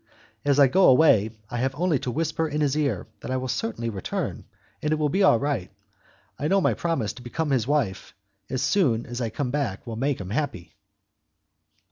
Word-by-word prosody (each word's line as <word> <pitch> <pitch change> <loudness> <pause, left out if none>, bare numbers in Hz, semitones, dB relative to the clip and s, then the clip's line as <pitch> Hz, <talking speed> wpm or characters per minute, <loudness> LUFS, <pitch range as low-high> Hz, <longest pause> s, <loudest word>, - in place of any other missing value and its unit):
As 145 -1 +2
I 140 - +8
go 185 +9 +4
away, 125 -6 +5 0.2
I 120 - -2
have 130 +2 -1
only 165 -2 +1
to 125 - -4
whisper 160 +4 -1
in 150 0 -2
his 145 -1 +1
ear 140 -11 0
that - - -8
I 130 - 0
will 130 0 -3
certainly 115 -1 -2
return, 95 -3 -4 0.4
and 150 - -1
it - - +4
will 150 -1 0
be 190 +7 +1
all 190 -11 +6
right. 140 -8 -2 0.7
I 145 - 0
know 195 +4 +3
my - - +2
promise 165 -11 -1
to - - -12
become 145 +5 -3
his 125 -4 +1
wife 115 -9 -1 0.3
as 130 0 -1
soon 135 - +2
as 120 +1 -5
I 115 - -1
come 125 +3 -3
back 130 -10 -2
will 115 -2 -5
make 135 +3 0
him 95 -1 -6
happy." 110 - -3
135 Hz, 205 wpm, -25 LUFS, 115-150 Hz, 0.7 s, I